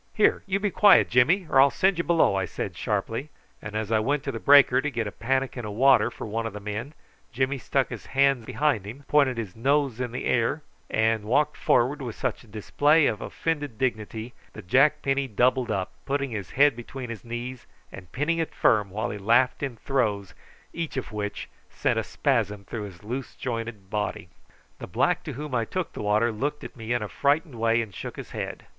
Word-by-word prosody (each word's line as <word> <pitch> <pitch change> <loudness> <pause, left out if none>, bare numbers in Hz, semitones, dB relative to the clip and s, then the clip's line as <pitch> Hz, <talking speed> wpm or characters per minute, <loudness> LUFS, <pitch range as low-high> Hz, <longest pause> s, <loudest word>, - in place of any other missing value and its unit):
"Here, 215 - +3
you 195 +1 0
be 205 0 -1
quiet, 205 - +6
Jimmy, 155 +11 +4
or 135 - +5
I'll 140 - +6
send 190 +5 +1
you - - +1
below," 170 -11 +3
I 95 -1 0
said 90 +1 -5
sharply; 115 - -2 0.3
and 105 +1 -7
as 110 0 -2
I 110 - +4
went 135 +6 0
to 140 - -3
the 115 - -5
breaker 140 -2 +6
to 150 - -1
get 120 -5 -2
a 100 - -4
pannikin 130 +2 -2
of 105 -1 -5
water 130 +4 +5
for - - -8
one 115 +1 -2
of 110 - -7
the 105 - -6
men, 105 +8 -5 0.4
Jimmy 130 +2 -1
stuck 135 +1 0
his 120 -4 -8
hands 135 -2 +2
behind 125 -5 0
him, 130 +7 -9
pointed 140 -4 +3
his 105 -6 -5
nose 135 0 +1
in 125 -2 -3
the 125 - -5
air, 125 +6 +1 0.3
and 110 -1 +1
walked 145 +7 +2
forward 140 +5 +2
with 120 -4 -5
such 125 -5 -3
a - - -19
display 145 +9 +2
of 110 - 0
offended 145 -7 -3
dignity 115 -1 -3 0.2
that 105 - -10
Jack 145 +8 +4
Penny 135 0 0
doubled 125 +2 +1
up, 95 -1 -2 0.2
putting 140 -1 -1
his 100 -4 -5
head 145 -1 +5
between 120 +1 -7
his 110 -5 -8
knees 120 +2 -6 0.2
and 90 -2 -11
pinning 160 +5 0
it 165 - -3
firm, 105 -3 +3
while 105 +3 -3
he 105 - -6
laughed 120 +5 +3
in 135 -4 -3
throes, 105 -7 -1 0.4
each 165 -4 -4
of 130 - -4
which 105 -1 -4 0.2
sent - - 0
a - - -1
spasm 105 -7 -1
through 105 0 -5
his 95 -1 -12
loose 125 +5 -5
jointed 115 -5 -5
body. 105 -1 -3 0.5
The - - -7
black - - +1
to - - -5
whom 145 +1 -6
I 120 -2 +1
took 185 +6 -4
the - - -6
water 105 +3 +2
looked 145 +7 -3
at - - -9
me 115 -1 -7
in 120 -2 +1
a - - -4
frightened 145 - 0
way, 115 0 +1
and 105 -3 -11
shook - - -7
his - - -9
head. - - -5
120 Hz, 215 wpm, -26 LUFS, 110-140 Hz, 0.5 s, quiet